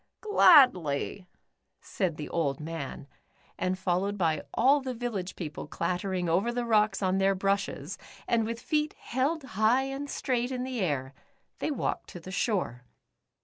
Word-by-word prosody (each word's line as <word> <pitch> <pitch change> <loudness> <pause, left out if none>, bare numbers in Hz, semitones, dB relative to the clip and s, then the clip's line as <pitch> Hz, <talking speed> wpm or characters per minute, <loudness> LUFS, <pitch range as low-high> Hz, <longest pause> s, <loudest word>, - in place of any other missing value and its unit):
"Gladly," 205 - +5 0.5
said 180 -6 -2
the 150 - -5
old 145 -5 -1
man, 155 -3 -6 0.5
and 185 0 0
followed 190 +2 0
by 160 -5 +1
all 275 +5 +4
the 260 -1 -4
village 215 -6 -4
people 150 -4 -6
clattering 180 +2 -2
over 190 +8 +2
the 240 0 -2
rocks 210 -3 +2
on 190 0 +2
their 195 0 +3
brushes, 195 -5 -1 0.3
and 230 -1 +2
with 230 +1 -3
feet 300 +4 0
held 275 +6 -1
high 225 +2 +2
and 270 +1 -5
straight 250 -3 -1
in 255 -1 -3
air, 155 - -2 0.5
they - - -1
walked 285 - -2
to 175 - -8
the 185 +2 -9
shore. 185 - -1
195 Hz, 145 wpm, -29 LUFS, 175-250 Hz, 0.5 s, Gladly